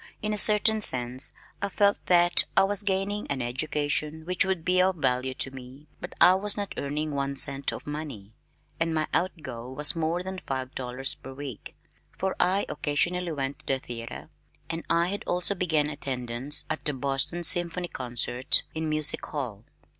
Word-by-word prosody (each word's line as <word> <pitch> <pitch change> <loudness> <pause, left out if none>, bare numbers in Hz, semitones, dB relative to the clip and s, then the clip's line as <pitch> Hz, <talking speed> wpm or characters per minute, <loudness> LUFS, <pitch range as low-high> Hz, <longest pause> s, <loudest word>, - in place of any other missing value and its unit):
In 215 0 0
a - - +1
certain 210 +1 +5
sense 125 -4 +2 0.3
I 200 - -1
felt 200 +1 +2
that 175 -1 +4
I - - +7
was 200 +1 0
gaining 200 +1 -1
an 140 -2 -2
education 150 +5 -1
which 180 0 +2
would 185 -3 -2
be 185 0 +3
of 185 0 +2
value 130 -4 0
to 130 - -2
me 130 +2 -11
but 175 - -8
I 180 - +8
was 200 +2 +1
not 205 -1 -4
earning 150 +2 -3
one 140 0 -2
cent 140 0 +3
of - - -8
money, 145 -9 -7 0.5
and 165 0 0
my 155 -1 +1
out 175 -3 -1
go 120 -3 -7
was 145 +5 +5
more 165 +2 -1
than 190 0 -5
five 130 -6 -5
dollars 130 +1 +1
per 135 - -11
week, 135 -5 -8 0.4
for 190 0 -1
I 190 +3 +2
occasionally 175 +4 -1
went 135 -1 -4
to - - -24
the - - +1
theater, 115 -2 -8 0.4
and 165 0 -4
I 170 +1 +2
had 200 +1 -4
also 180 +3 0
begun 160 -5 +1
attendance 130 -1 -2
at 155 - -4
the 150 - -1
Boston 135 +6 -2
Symphony 175 +1 +4
concerts 125 0 0
in 160 0 -3
Music 155 -1 +1
Hall. 120 -8 -5
155 Hz, 180 wpm, -27 LUFS, 135-180 Hz, 0.5 s, I